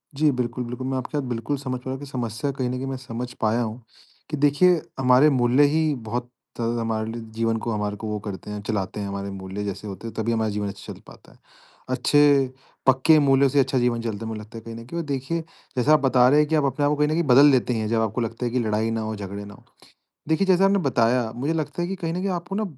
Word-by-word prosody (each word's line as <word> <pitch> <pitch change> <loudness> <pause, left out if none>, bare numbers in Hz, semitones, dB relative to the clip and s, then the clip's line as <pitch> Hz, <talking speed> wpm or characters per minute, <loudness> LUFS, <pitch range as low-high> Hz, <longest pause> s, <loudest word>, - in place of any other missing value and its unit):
जी, 150 +2 +3
बिल्कुल, 125 -1 -2
बिल्कुल, 125 +2 -5
मैं 130 0 -1
आपकी 130 +4 -4
बात 145 - -1
बिल्कुल 120 +4 -2
समझ 130 -2 -4
पा - - -21
रहा 130 - -3
हूँ 135 - -4
कि 145 - -8
समस्या 125 -1 -3
कहीं 125 -2 -1
न - - -2
कहीं 125 +1 -3
मैं 135 -1 -3
समझ 125 -1 -6
पाया 110 +2 +2
हूँ, 115 +1 -4 0.5
कि 150 - -3
देखिए 150 +5 +4 0.2
हमारे 130 +3 +5
मूल्य 130 0 +3
ही 160 -1 +2
बहुत 120 +2 -3 0.3
हमारे 115 -1 -1
लिए 115 0 -6
जीवन 115 0 +1
को 120 - -1
हमारे 105 -1 -2
को 110 - -6
वो 105 0 -2
करते 100 +1 -6
हैं, 105 0 -5
चलाते 100 -1 -2
हैं 100 - -3
हमारे 100 0 -4
मूल्य 95 +1 -6
जैसे 100 +1 -5
होते 100 +3 -7
हैं 115 - -7
तभी 115 +1 0
हमारा 110 -1 0
जीवन 105 0 -2
अच्छा 100 0 -7
चल - - -14
पाता - - -16
है। - - -21 0.5
अच्छे 140 +1 +4 0.4
पक्के 135 +4 +5
मूल्यों 135 -1 +4
से 140 - +2
अच्छा 135 0 +2
जीवन 120 -1 +1
चलता 115 -1 -4
है - - -4
मुझे 110 -1 -5
लगता 110 +2 -10
है - - -7
कहीं 115 0 -7
न 115 0 -9
कहीं 150 +8 -7
और - - -2
देखिए 140 +4 -2 0.4
जैसा 140 +5 +4
आप 155 - +6
बता 130 -2 +4
रहे 145 +3 +5
हैं 150 - +3
कि 160 - +2
आप 150 - +2
अपने 140 +2 0
आप - - +3
को - - +2
कहीं 150 0 +2
न - - -1
कहीं 165 +2 +1
बदल 140 0 +7
लेते 125 -1 +2
हैं 110 -2 -1
जब 115 0 +2
आपको 110 +2 -1
लगता 115 +2 -3
है 120 - -1
कि 125 - +1
लड़ाई 110 -1 0
ना 115 0 -1
हो, 110 0 -3
झगड़े 100 0 -6
ना 100 - -11
हो। - - -18 0.6
देखिए 160 +5 +1
जैसा 190 0 +5
आपने 195 +1 +4
बताया, 120 -5 +1
मुझे 140 +7 -1
लगता 160 +2 -3
है 175 - -1
कि 195 - -3
कहीं 165 -3 -3
न - - -4
कहीं 195 - -1
आपको 175 +3 -7
ना, 215 - 0
125 Hz, 275 wpm, -24 LUFS, 110-145 Hz, 0.6 s, बदल